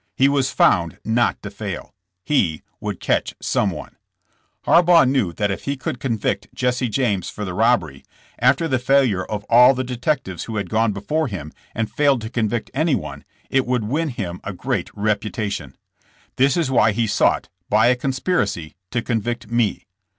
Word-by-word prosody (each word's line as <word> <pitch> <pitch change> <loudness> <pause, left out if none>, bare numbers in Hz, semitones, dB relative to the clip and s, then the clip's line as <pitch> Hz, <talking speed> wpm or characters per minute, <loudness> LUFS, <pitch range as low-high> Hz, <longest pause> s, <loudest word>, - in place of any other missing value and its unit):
He 135 - +4
was 140 -1 +2
found 85 -3 +2
not 115 +2 +1
to 100 - -6
fail. 100 -3 -6 0.3
He 90 - +1 0.2
would - - -4
catch - - 0
someone. - - -2 0.7
Harbaugh 170 -3 +6
knew 130 -9 +1
that 100 +3 -1
if 95 - -5
he 140 0 -2
could 125 -1 -4
convict 115 -6 -1
Jesse 125 -1 0
James 105 -6 0
for 105 - -6
the 95 - -4
robbery, 90 - +1 0.4
after 135 +6 +3
the 130 -4 +1
failure 125 -7 +2
of 105 +1 -5
all 125 +3 +7
the 130 - -1
detectives 125 - -2
who 115 - -6
had 100 - -3
gone 110 0 +2
before 150 +11 -1
him 85 - -6 0.2
and 110 -1 -2
failed 140 -4 +2
to 110 +1 -6
convict 115 -2 -1
anyone, 120 - -1 0.3
it 135 -2 +2
would 125 -2 0
win 150 +9 -1
him 95 -8 -5
a 100 - -5
great 90 - -2
reputation. 105 - -2 0.6
This 135 +3 +3
is 160 -6 0
why 110 -4 +4
he 115 +2 +1
sought, 105 - +1 0.2
by 110 +2 +4
a 125 +1 +5
conspiracy, 130 - -1 0.2
to 120 -2 -2
convict 120 0 -3
me. 120 -4 0
115 Hz, 170 wpm, -21 LUFS, 100-130 Hz, 0.7 s, all